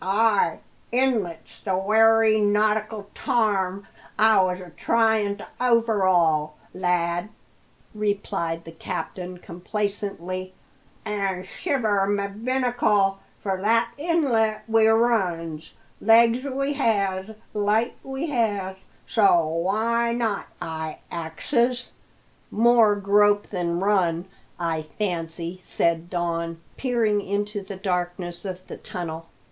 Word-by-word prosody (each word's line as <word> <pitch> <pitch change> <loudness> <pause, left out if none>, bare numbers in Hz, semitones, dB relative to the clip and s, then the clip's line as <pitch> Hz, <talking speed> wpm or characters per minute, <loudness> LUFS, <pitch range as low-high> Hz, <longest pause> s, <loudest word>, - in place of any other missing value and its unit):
"Ay, 205 -2 +2 0.3
inlet's 230 -10 -1
the 190 -2 0
wery 220 +2 +4
nautical 210 0 +1
tarm 200 -6 0 0.3
I 220 -2 +5
was 185 -1 0
a 180 -2 -10
tryin' 220 +1 +1
to 205 - -10
overhaul, 185 -11 +2 0.2
lad," 175 +1 0 0.6
replied 200 -5 -2
the 165 - -10
captain 180 +2 -5
complacently. 185 0 -4 0.5
"An' 195 -3 -2
shiver 215 - 0
my 200 0 0
binnacle! 215 -3 +1 0.2
for 190 -2 -2
that 230 +3 +2
inlet 275 -9 +1
we 225 0 +4
runs. 180 -9 +1 0.3
Legs 230 +3 +5
we 275 +1 -1
has, 200 -6 0 0.2
light 215 +3 +1
we 270 +4 -4
has! 205 -6 -1 0.3
so 195 -7 +4
why 220 +9 0
not? 225 -4 -1
I 160 -1 -5
axes." 235 - -1 0.6
"More 230 -2 +5
grope 205 +1 +3
than 175 -3 -1
run, 180 -4 +1 0.3
I 165 -2 -1
fancy," 170 0 -4
said 170 -1 0
Don, 170 -2 -2 0.2
peering 230 -5 +1
into 205 +1 -2
the 195 0 -8
darkness 175 -1 -3
of 185 -1 -6
the - - -8
tunnel. 165 -2 -6
200 Hz, 105 wpm, -24 LUFS, 180-225 Hz, 0.6 s, I